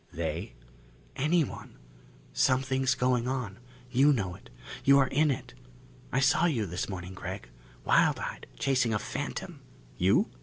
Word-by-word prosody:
"They?" 85 +5 -4 0.6
"Anyone. 155 +2 -1 0.6
Something's 130 0 +2
going 125 -1 +1
on. 125 -7 -3 0.3
You 135 +4 +5
know 100 -10 0
it. - - -14 0.3
You 140 0 +6
are 135 - +5
in 150 +4 +2
it. 135 - -3 0.6
I 135 - +2
saw 135 +5 +4
you 120 -10 0
this 90 +2 -3
morning, 90 -1 -6
Gregg. 95 - -7 0.4
Wild - - +4
eyed, - - -6
chasing 125 -5 +1
a - - +3
phantom - - -5 0.2
" - - -25
"You?" 100 - +3
125 Hz, 145 wpm, -29 LUFS, 95-135 Hz, 0.6 s, You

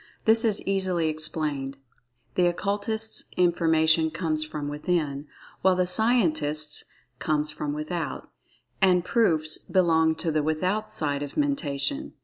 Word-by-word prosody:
This 225 +1 +5
is 215 -3 0
easily 185 -4 0
explained—the 135 -2 -3
Occultist's 205 +5 -1
information 160 -2 +3
comes 155 -2 -2
from 155 -1 -5
"within," 150 -1 -2 0.3
while 190 -1 +4
the 180 0 +2
Scientist's 155 -8 +1 0.3
comes 150 0 0
from 150 -1 -4
without—and 170 +3 -2
"proofs" 160 -9 +1
belong 160 -4 +2
to 160 +1 -2
the 155 0 +1
"without" 185 +8 -1
side 145 -8 -2
of 145 -1 -6
Mentation. 280 - -1
160 Hz, 115 wpm, -26 LUFS, 150-185 Hz, 0.3 s, This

